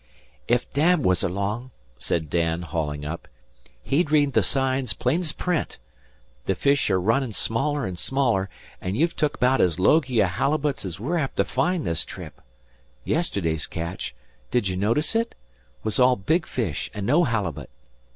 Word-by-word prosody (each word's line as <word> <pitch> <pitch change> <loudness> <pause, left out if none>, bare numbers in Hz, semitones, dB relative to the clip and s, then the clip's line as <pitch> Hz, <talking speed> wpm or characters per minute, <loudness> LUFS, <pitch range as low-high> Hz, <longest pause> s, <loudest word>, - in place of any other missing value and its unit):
"Ef 120 +1 +3
Dad 155 +2 +3
was 90 -1 +3
along," 100 +7 -2 0.3
said 80 +4 -1
Dan, 85 +1 0
hauling 75 -2 -3
up, 85 +3 -5 0.6
"he'd 155 +2 +1
read 145 -2 +3
the 110 - +4
signs 130 +4 0
plain's 155 +6 0
print. 175 -1 -2 0.7
The 95 - +2
fish 140 +5 +2
are 95 -2 +3
runnin' 115 +5 +1
smaller 140 +7 0
an' 90 -2 -4
smaller, 115 -2 +1 0.3
an' 95 +2 -2
you've 165 +7 +1
took 150 -2 0
'baout 130 +2 +4
as 85 -3 +2
logy 130 - +3
a 100 - +6
halibut's 135 - -1
we're 160 +10 0
apt 135 -3 -3
to - - +3
find 180 -2 0
this 85 -1 0
trip. - - -10 0.6
Yesterday's 90 - 0
catch 85 +3 -5 0.3
did 120 -5 +1
ye 95 - -2
notice 115 - +1
it? 230 +1 0 0.5
was 110 +2 -1
all 125 0 +6
big 160 - 0
fish 100 - -2
an' 100 - -3
no 150 +9 +4
halibut. 90 - -2
120 Hz, 160 wpm, -25 LUFS, 90-145 Hz, 0.7 s, a